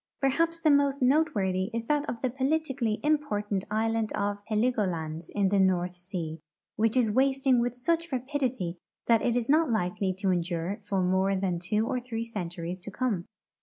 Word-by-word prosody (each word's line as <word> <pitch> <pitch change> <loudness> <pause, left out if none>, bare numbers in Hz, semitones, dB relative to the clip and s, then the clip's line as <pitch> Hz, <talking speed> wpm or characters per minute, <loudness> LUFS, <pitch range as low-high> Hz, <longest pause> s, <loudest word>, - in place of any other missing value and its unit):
Perhaps 330 +5 +1
the 310 - +4
most 280 -1 +3
noteworthy 220 - +2
is 230 - -1
that 295 +4 0
of 235 - -5
the 255 - +1
politically 270 -4 0
imjjortaiit 210 -11 0
island 220 +1 0
of 205 0 -2
Heligoland 185 -9 -1
in 200 -2 +2
the 200 0 +2
North 180 -2 +2
sea, 175 -3 -5 0.4
which 225 +3 +2
is 230 -4 +3
wasting 265 +1 +3
with 240 0 0
such 335 +6 0
rapidity 255 - -2 0.3
that 230 -2 +4
it 240 - +1
is 240 -2 0
not 310 +1 +4
likely 190 -2 0
to 190 0 0
endure 175 +2 -1
for 200 -2 -1
more 190 +2 +2
than 185 -2 -1
two 210 +5 0
or 250 - -1
three 235 -2 -4
centuries 175 -4 -5
to 180 - -8
come. 210 -6 -2
220 Hz, 170 wpm, -28 LUFS, 185-260 Hz, 0.4 s, the